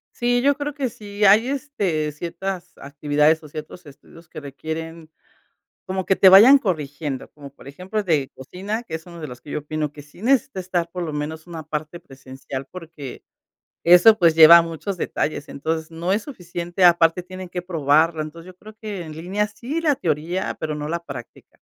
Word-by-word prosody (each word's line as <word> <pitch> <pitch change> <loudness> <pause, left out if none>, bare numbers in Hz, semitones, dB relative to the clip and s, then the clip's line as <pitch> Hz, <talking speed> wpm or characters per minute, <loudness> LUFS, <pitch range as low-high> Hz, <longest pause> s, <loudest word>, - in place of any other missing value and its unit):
Sí, 245 0 +1
yo 280 +2 +3
creo 290 0 -4
que 270 -4 -2
sí, 205 -1 -6
hay 210 +4 +6
este, 205 - -2
ciertas 175 +4 -6
actividades 150 +2 +1
o - - -10
ciertos 155 +4 -9
estudios 160 +3 -16
que 155 - -9
requieren 160 +3 -7 0.8
como 190 0 -3
que 190 - +2
te 190 - +7
vayan 225 +9 +9
corrigiendo, 150 - -4
como 145 -2 -12
por - - -18
ejemplo 185 +9 -5
el 210 - -1
de 145 -5 +1
cocina, 200 - -5
que 160 - -8
es 160 0 -5
uno 170 -1 -11
de 155 - -5
los 125 -2 -10
que 145 - -13
yo - - -2
opino 150 0 -4
que 145 - -12
sí 150 +6 -17
necesita 265 -3 +1
estar 175 -2 -2
por 180 0 -5
lo 160 -3 -4
menos 155 +2 -5
una 165 -2 -7
parte 155 +3 -5
presencial 135 0 -9
porque 160 -7 -9 0.6
eso 180 +6 +7
pues 170 -4 +4
lleva 165 +1 +10
muchos 165 +4 -5
detalles, 150 -3 -3
entonces 160 +3 -4
no 170 +3 -3
es 210 +2 +1
suficiente. 175 - -4
Aparte, 170 0 +5
tienen 185 0 -9
que 180 0 -4
probarla. 160 -1 +2
Entonces, 165 +3 -10
yo 180 - -26
creo 215 +3 -14
que 210 -4 -6
en 155 - -9
línea 190 +6 -2
sí 245 +9 -5
la 310 -3 +2
teoría, 165 - -2
pero 155 -1 -3
no 150 0 -5
la 170 0 -3
práctica. 130 -4 -11
170 Hz, 195 wpm, -22 LUFS, 155-195 Hz, 0.8 s, lleva